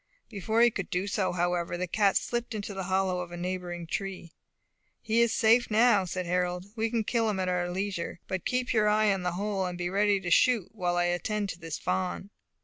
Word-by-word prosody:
Before 220 +3 0
he 240 - +5
could 195 -4 -5
do 180 +2 -1
so, 200 -1 0
however, 175 0 -1
the 180 - -1
cat 195 +2 +2
slipped 240 -1 -3
into 205 -1 -5
the 190 -1 -4
hollow 190 -1 0
of 175 -1 -7
a 175 - -6
neighbouring 175 -1 -4
tree. 185 -1 -5 0.7
"He 230 +1 +1
is 235 -1 +3
safe 230 +2 +4
now," 215 -3 +4
said 185 0 -4
Harold; 180 +1 -1
"we 225 0 0
can 230 -1 0
kill 225 0 +1
him 200 -3 -1
at 185 - -1
our 175 -1 0
leisure. 185 -2 -3
But 185 -2 -3
keep 250 0 -1
your 215 -2 +3
eye 210 -1 +3
on 195 - -3
the 180 -1 -2
hole, 200 +1 -1
and 180 -1 -5
be 175 0 -3
ready 200 0 +2
to 175 -2 -4
shoot, 235 -2 +4
while 180 -5 -1
I 175 - +3
attend 195 +4 -1
to 170 - -6
this 165 -2 -5
fawn." 185 +2 -2
190 Hz, 225 wpm, -28 LUFS, 180-215 Hz, 0.7 s, he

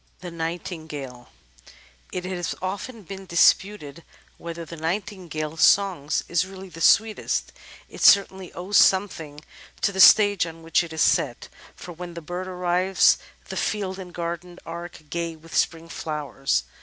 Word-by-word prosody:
The 180 -1 -7
Nightingale 160 -6 -6 0.8
It 180 -1 -4
has 180 -2 -3
often 205 +5 -5
been 190 +1 -9
disputed 170 -2 +2 0.4
whether 170 0 -6
the 170 - -9
Nightingale's 165 -2 -4
song 190 -8 +4 0.2
is 170 +1 +2
really 190 0 -10
the 165 -1 -11
sweetest. 220 +6 +2 0.4
It - - -11
certainly 190 -2 +4
owes 185 +4 0
something 165 -7 +2 0.4
to 200 - +2
the 190 - -6
stage 205 -3 +7
on 165 0 -10
which 165 +1 +2
it 170 - -9
is 160 -1 +1
set, - - +1 0.3
for 180 - -10
when 175 0 -8
the 170 - -6
bird 175 +3 -5
arrives 180 +1 +2 0.3
the - - -5
field 195 -3 -2
and 180 -2 -8
garden 175 +1 -5
arc 170 0 -8
gay 170 -1 -3
with 160 +1 -12
spring 165 0 0
flowers. 145 - -2
175 Hz, 145 wpm, -24 LUFS, 165-190 Hz, 0.8 s, stage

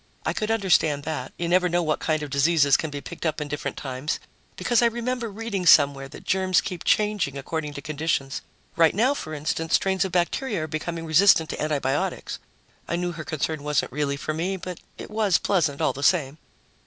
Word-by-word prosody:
I - - 0
could 215 - -2
understand 175 -9 +2
that; 145 -5 -4
you 170 - -2
never 180 +1 +3
know 175 +1 +1
what 155 -1 0
kind 155 -1 0
of 145 - -6
diseases 145 0 +4
can 160 - -1
be 145 -1 -6
picked 170 - -9
up 155 -2 -1
in 150 - -3
different 145 0 -4
times, 130 +2 -3 0.4
because 240 -1 +2
I 235 - +5
remember 235 0 -2
reading 205 -3 -3
somewhere 140 -3 +5
that - - -11
germs 185 -1 +2
keep 180 -4 -5
changing 210 -10 +1
according 150 +1 -4
to 145 - -7
conditions. 150 -3 -2 0.3
Right 165 -1 +4
now, 245 +7 +3
for 155 - -6
instance, 155 +2 0
strains 190 0 +1
of 190 - -3
bacteria 180 +3 0
are - - -4
becoming 165 +2 -4
resistant 160 0 +5
to - - -5
antibiotics. 145 -2 -1 0.5
I - - -1
knew 175 0 -1
her 165 -2 -7
concern 155 0 -2
wasn't 150 -1 0
really 140 +1 -1
for 155 - -3
me, 180 +5 -2
but 180 -1 -7 0.2
it - - -9
was 210 -4 +3
pleasant 165 -8 0
all - - +2
the 140 - -7
same. 150 -2 +2
160 Hz, 205 wpm, -25 LUFS, 150-190 Hz, 0.5 s, I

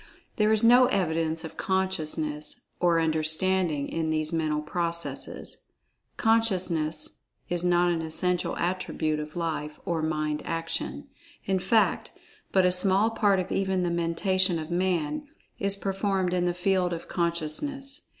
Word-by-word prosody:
There 215 0 +3
is 220 0 +3
no 245 +2 +7
evidence 165 -6 0
of 160 - -9
"consciousness" 155 -5 -1 0.2
or 170 -2 +3
"understanding" 160 0 +3
in 160 -1 -2
these 155 0 0
mental 155 -2 0
processes. 170 +1 -3 0.6
Consciousness 185 -9 +1 0.3
is 175 0 0
not 175 0 +3
an 165 -1 -1
essential 175 +3 -1
attribute 170 -3 -1
of 150 0 -7
Life 160 -3 -3
or 170 -4 -1
Mind 155 -1 -1
action. 165 - -4 0.4
In 190 -1 +1
fact, 210 +4 +1 0.4
but 190 -1 +4
a 180 - +4
small 190 +4 +3
part 205 -4 +2
of 185 +1 -4
even 190 -1 0
the 175 - 0
Mentation 175 +2 +1
of 160 +1 -6
Man 180 - -1 0.3
is 200 0 +2
performed 195 -2 -1
in 180 -1 +1
the 175 0 0
field 180 -1 +1
of 165 - -6
consciousness. 180 - -2
175 Hz, 140 wpm, -27 LUFS, 160-190 Hz, 0.6 s, no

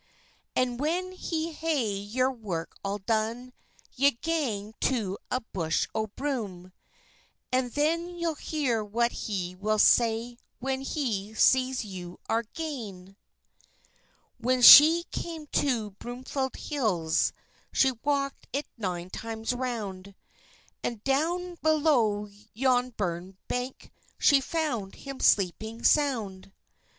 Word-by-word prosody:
"And 250 -1 0
when 350 +6 -1
he 330 -3 -3
hae 300 -9 -1
your 230 +7 0
work 195 -9 -5
all 200 +1 -2
done, 225 +4 -2 0.4
Ye'll 280 0 +3
gang 235 -11 -1
to 210 -7 0
a 255 - -1
bush 165 -3 0
o' 220 0 -1
broom, 205 -8 -4 0.8
And 255 -1 +1
then 335 +4 0
you'll 340 -1 -1
hear 280 -7 -1
what 235 +3 0
he 185 -4 -3
will 210 +3 -1
say, 235 +2 +3 0.2
When 265 +1 -2
he 220 -7 -3
sees 255 0 +3
ye 180 -3 -8
are 225 +1 +1
gane." 210 - -6 1.2
When 250 +1 +1
she 320 +7 +10
came 325 -3 -5 0.2
to 235 -7 -1
Broomfield 255 +5 -4
Hills, 190 - 0 0.4
She 265 - +4
walked 275 -1 -1
it 280 +3 -2
nine 180 -3 -3
times 225 +1 -3
round, 205 -6 -4 0.7
And 230 -3 -3
down 345 +6 0
below 275 -10 +2 0.3
yon 255 0 +2
burn 180 0 -3
bank, 250 +1 -4 0.3
She 280 -2 +5
found 260 -10 -2
him 275 -1 -8
sleeping 220 +4 +1
sound. 220 -11 +1
245 Hz, 115 wpm, -28 LUFS, 205-280 Hz, 1.2 s, she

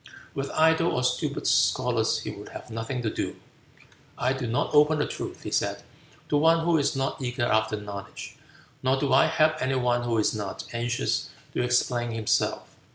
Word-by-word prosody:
With 140 0 -3
idle 160 +1 +4
or 125 - 0
stupid 125 - -1
scholars - - +2
he - - -5
would - - -10
have - - -10
nothing 115 +3 -4
to 110 - -1
do. - - -3 0.8
"I 130 +1 +1
do 135 -2 -4
not 115 +6 -1
open 150 +1 +5
the 145 - +1
truth," - - -6
he - - -5
said, - - -1 0.5
"to 145 - +3
one 165 +2 +4
who 170 -1 +3
is 140 - 0
not 135 +1 -2
eager 120 -1 -1
after 110 -2 +1
knowledge, 100 -1 -8 0.5
nor 130 +1 +2
do 135 -2 +1
I 135 - +6
help 155 0 +3
any 130 +1 0
one 125 -1 +1
who 120 -1 0
is 105 - +2
not 105 -3 -5
anxious 120 0 -1 0.2
to - - 0
explain 120 0 +1
himself. 110 -2 0
125 Hz, 185 wpm, -26 LUFS, 115-140 Hz, 0.8 s, I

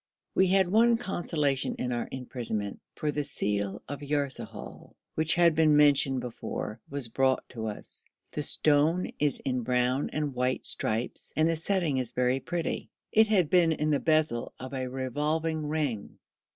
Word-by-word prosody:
We 190 - +4
had 190 0 +3
one 230 +5 +4
consolation 160 - -1
in 125 - -3
our 120 -1 -2
imprisonment, 120 -5 -3 0.2
for 150 -2 -1
the 145 0 -2
seal 100 -5 -2
of 145 +1 -6
Yarsahal, 145 -2 -4 0.2
which 160 +1 +2
has 170 -1 +5
been 155 -1 +4
mentioned 140 -3 +4
before, 115 -2 -5
was 140 -3 -3
brought 130 +3 +1
to 110 -2 -5
us. 105 - -7 0.3
The 150 - -3
stone 155 +4 +2
is 145 -1 +3
in 130 -2 0
brown 125 +3 +1
and 150 -2 -2
white 125 +1 0
stripes, 110 +3 0
and 155 +1 +3
the 165 - +1
setting 165 -3 +1
is 125 -3 0
very 125 +1 +1
pretty. 170 +3 -3 0.2
It 220 0 +5
had 190 -8 +2
been 170 -3 +5
in 155 0 -1
the 145 - +2
bezel 155 -7 +1
of 130 +1 -7
a 130 -1 -2
revolving 150 +5 -2
ring. 145 -9 -2
145 Hz, 165 wpm, -28 LUFS, 125-160 Hz, 0.3 s, has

